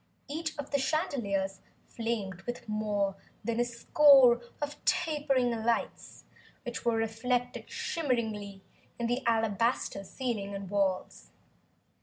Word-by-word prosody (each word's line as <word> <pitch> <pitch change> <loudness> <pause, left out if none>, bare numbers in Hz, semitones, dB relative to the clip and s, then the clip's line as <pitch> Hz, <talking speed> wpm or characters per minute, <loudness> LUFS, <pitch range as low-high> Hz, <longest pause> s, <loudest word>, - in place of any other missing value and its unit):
Each 315 +2 -4
of 290 -1 -6
the 280 - +2
chandeliers 220 - -1 0.2
flamed 215 -6 -3
with 240 -1 -5
more 210 -2 0 0.3
than 230 +2 -1
a - - +5
score 245 +1 +6 0.2
of 290 0 -5
tapering 285 -6 +2
lights 230 0 -2 0.4
which 240 -1 -5
were 235 -1 +2
reflected 240 +3 -1
shimmeringly 235 - -2 0.4
in 235 - -2
the 245 +3 0
alabaster 225 -2 +1
ceiling 205 -3 -3
and 195 -1 -6
walls. 190 - -1
235 Hz, 115 wpm, -30 LUFS, 205-265 Hz, 0.4 s, score